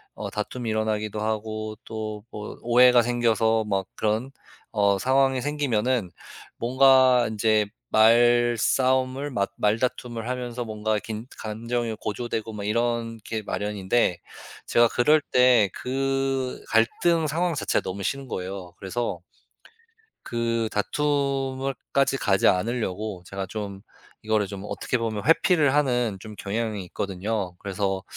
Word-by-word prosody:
어 - - -5
다툼이 115 +3 -4
일어나기도 110 -1 -1
하고 110 0 -3
또 110 -1 -5
뭐 105 -2 -7
오해가 125 +1 +6
생겨서 115 -2 +2
막 100 -3 -1
그런 110 +4 -1 0.4
어 100 -2 +2
상황이 135 +2 +2
생기면은 125 -7 0 0.5
뭔가 130 0 +5
인제 110 0 +2 0.2
말싸움을 120 +4 +3
마 100 -6 0
말다툼을 115 +1 -1
하면서 125 -1 -4
뭔가 110 -1 -1
긴 110 +1 -6
감정이 115 +1 -3
고조되고 110 0 -4
막 105 -1 -6
이런 115 +1 -1
게 110 -1 -3
마련인데 105 -2 0 0.5
제가 120 0 +5
그럴 150 +8 +4
때 125 -5 +5
그 135 0 -1
갈등 160 +9 +2
상황 165 +3 0
자체가 - - 0
너무 95 +1 -5
싫은 135 +6 -2
거예요. 95 -3 -6
그래서 100 -1 -3 1.1
그 115 -1 -1
다툼을 135 +2 -1 0.2
까지 140 0 +2
가지 100 -7 +3
않으려고 105 -2 -1
제가 95 0 -5
좀 100 -1 -6 0.4
이거를 110 -1 +1
좀 100 0 -8
어떻게 125 - -2
보면 110 -3 -3
회피를 160 -3 +4
하는 125 -8 +1
좀 110 +1 -9
경향이 105 -1 -3
있거든요. 95 +1 -3
그래서 95 -1 -2
115 Hz, 270 characters per minute, -25 LUFS, 105-125 Hz, 1.1 s, 오해가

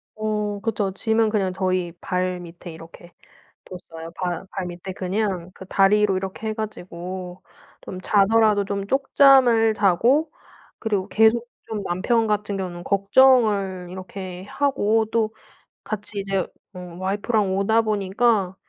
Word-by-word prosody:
어 210 -1 -2
그쵸. 210 -3 -1
짐은 220 +3 +1
그냥 195 -4 0
저희 185 -2 -1
발 180 0 -2
밑에 175 0 -10
이렇게 165 +2 -13 0.5
뒀어요. 165 -2 -10
발 180 0 -3
발 190 -2 -4
밑에 175 +2 -7
그냥 185 -1 -2
그 190 - -11
다리로 195 +1 +3
이렇게 195 +3 -5
해 215 - -1
가지고 185 -3 -7 0.4
좀 185 - -8
자더라도 210 +1 +3
좀 200 0 -3
쪽잠을 265 -3 +5
자고. 230 - +2 0.5
그리고 205 -4 -1
계속 225 +2 +3 0.2
좀 215 -2 -3
남편 220 +6 +1
같은 210 -1 -1
경우는 175 -2 -5
걱정을 200 -3 +3
이렇게 185 0 -8
하고 225 -6 +1
또 220 -1 +1 0.5
같이 210 -1 -5
이제 195 -1 -1 0.3
어 180 - -9 0.2
와이프랑 200 +1 0
오다 220 +3 +3
보니까 205 -1 +1
200 Hz, 265 characters per minute, -23 LUFS, 185-220 Hz, 0.5 s, 쪽잠을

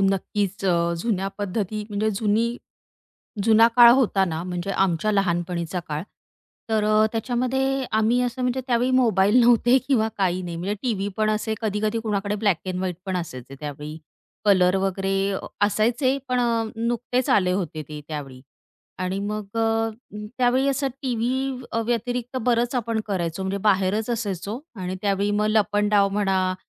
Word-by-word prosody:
नक्कीच. 195 0 -1
अ, 170 -2 +2
जुन्या 195 -2 -1
पद्धती 205 +1 -3
म्हणजे 210 +1 0
जुनी 225 +2 +1 0.9
जुना 225 +1 +6
काळ 240 -1 +10
होता 235 -7 +3
ना, 165 -3 -3
म्हणजे 180 +1 -4
आमच्या 195 +1 +1
लहानपणीचा 175 -2 -1
काळ. 150 +1 -3 0.7
तर 215 -1 +2
अ, 215 0 +4
त्याच्यामध्ये 255 +3 0
आम्ही 220 +3 +2
असं 250 +1 -2
म्हणजे 250 +1 0
त्यावेळी 245 0 +1
मोबाईल 230 -3 +4
नव्हते 240 +1 +5
किंवा 225 -5 +3
काही 185 -1 +1
नाही, 175 -2 -5
म्हणजे 185 +5 -2
टीव्ही 205 -6 -1
पण 215 0 +2
असे 215 +1 -1
कधी-कधी 215 0 -1
कुणाकडे 205 -2 -1
ब्लॅक 200 -4 +4
अँड 185 -1 -2
व्हाईट 185 -2 -2
पण 185 - -1
असायचे 135 -6 -6
त्यावेळी. 150 +1 -6 0.5
कलर 185 -2 +4
वगैरे 195 +1 0 0.3
असायचे, 240 +6 +1
पण 250 0 +1
अ, 230 -2 +1
नुकतेच 240 +2 -1
आले 185 -2 +3
होते 170 -5 -3
ते 150 -1 -7
त्यावेळी 140 -4 -6 0.6
आणि 185 +1 -2
मग 210 +1 -5
अ, 225 0 +1 0.5
त्यावेळी 255 +2 +3
असं 275 0 0
टी 255 -3 -1
व्ही 255 +3 -1
अ, 230 - 0
व्यतिरिक्त 245 +1 -2
बरंच 240 +1 +1
आपण 230 -2 -1
करायचो, 175 -3 -2
म्हणजे 190 +1 -2
बाहेरच 200 +3 +1
असायचो 210 -1 -3 0.2
आणि 185 0 -3
त्यावेळी 200 0 +1
मग 210 +1 +1
लपंडाव 210 -1 +3
म्हणा 195 -2 0
210 Hz, 155 wpm, -24 LUFS, 190-235 Hz, 0.9 s, काळ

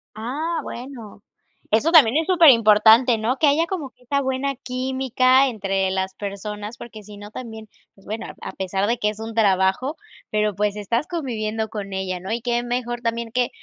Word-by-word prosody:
Ah, 290 +10 -3
bueno. 235 -5 -9 0.5
Eso 260 +10 +3
también 290 -5 +6
es 320 - +1
superimportante, 230 - +6
¿no? 245 +4 -1
Que 310 - +2
haya 320 +4 +3
como 305 -9 -4
que 250 - -35
esa 280 +3 0
buena 265 +1 -2
química 260 +1 +1
entre 195 -4 -1
las 190 0 -2
personas, 210 +2 -6
porque 215 -3 -10
si 205 0 -12
no, 205 0 -10
también, 220 -3 -8 0.3
pues, 195 - -23
bueno, 215 +1 -5
a - - -8
a - - -7
pesar 190 +1 -2
de 235 +1 +1
que 210 -2 0
es 215 0 -7
un 225 0 -7
trabajo, 200 - +2 0.4
pero, 210 -2 0
pues, 205 0 0
estás 230 +7 -1
conviviendo 220 - -3
con 200 -3 -6
ella, 185 -1 -3
¿no? 190 +4 -7
Y 235 0 -2
qué 240 0 -1
mejor 240 0 -3
también 230 -1 -3
que, 250 +1 0
230 Hz, 190 wpm, -22 LUFS, 210-260 Hz, 0.5 s, también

